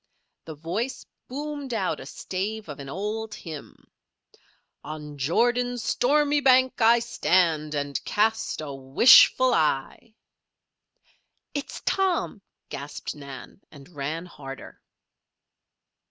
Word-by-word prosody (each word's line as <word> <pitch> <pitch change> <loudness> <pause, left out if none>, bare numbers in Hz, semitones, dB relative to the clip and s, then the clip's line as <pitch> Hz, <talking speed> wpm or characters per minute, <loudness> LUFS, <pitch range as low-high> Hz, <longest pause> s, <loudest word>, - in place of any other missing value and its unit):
The 160 - -8
voice 190 - -4 0.2
boomed 285 -1 -5
out 195 -4 -1
a - - -9
stave 205 +3 -4
of 145 - -7
an 135 -1 -8
old 210 +6 -4
hymn: 155 -4 -10 1.0
"On 150 -1 -7
Jordan's 240 - +1
stormy 290 +5 +2
bank 260 -2 +4
I 230 +1 +6
stand, 170 -9 +1
And 145 -1 -3
cast 220 -4 0
a 145 -2 -6
wishful 145 - +6
eye." 155 +8 -1 1.4
"It's 285 -1 -5
Tom!" 365 - 0 0.3
gasped 145 +1 -6
Nan, 140 +3 -11
and 140 -1 -14
ran 155 +2 -4
harder. 135 -5 -10
190 Hz, 105 wpm, -25 LUFS, 150-245 Hz, 1.4 s, I